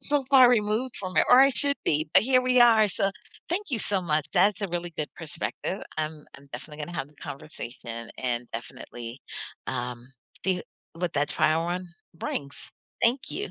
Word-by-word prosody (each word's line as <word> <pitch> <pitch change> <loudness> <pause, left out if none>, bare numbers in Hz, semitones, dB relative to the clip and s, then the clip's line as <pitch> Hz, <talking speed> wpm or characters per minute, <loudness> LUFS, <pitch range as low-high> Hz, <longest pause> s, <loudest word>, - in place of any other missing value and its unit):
so 290 -1 +1
far 260 -3 +9
removed 230 +2 +2
from 185 -1 -6
it - - +6
or 250 - +9
I 275 +1 +7
should 280 +1 +2
be, 155 0 +1
but - - +8
here 255 +2 +4
we 255 0 +4
are 225 -3 +7
so, 195 +1 0 0.4
thank 375 +2 -2
you 240 - 0
so 195 -1 0
much, 155 -4 0
that's 195 +1 +3
a 200 - -2
really 175 0 -3
good 150 - -2
perspective. 175 +4 -4 0.2
I'm 155 -1 -3
I'm 140 - -16
definitely 150 +5 -7
gonna 175 +1 -8
have 135 +1 -3
the 150 - -23
conversation 120 -5 -8
and 125 -1 -2
definitely, 120 +1 -8 0.5
um, 125 -1 -4 0.4
see 185 -1 +1 0.3
what 175 0 -2
that 145 0 +1
trial 155 +2 +2
run 180 +1 -2 0.3
brings, 140 -3 -4 0.5
thank 240 +3 +2
you. 410 +3 -4
175 Hz, 180 wpm, -27 LUFS, 145-230 Hz, 0.5 s, far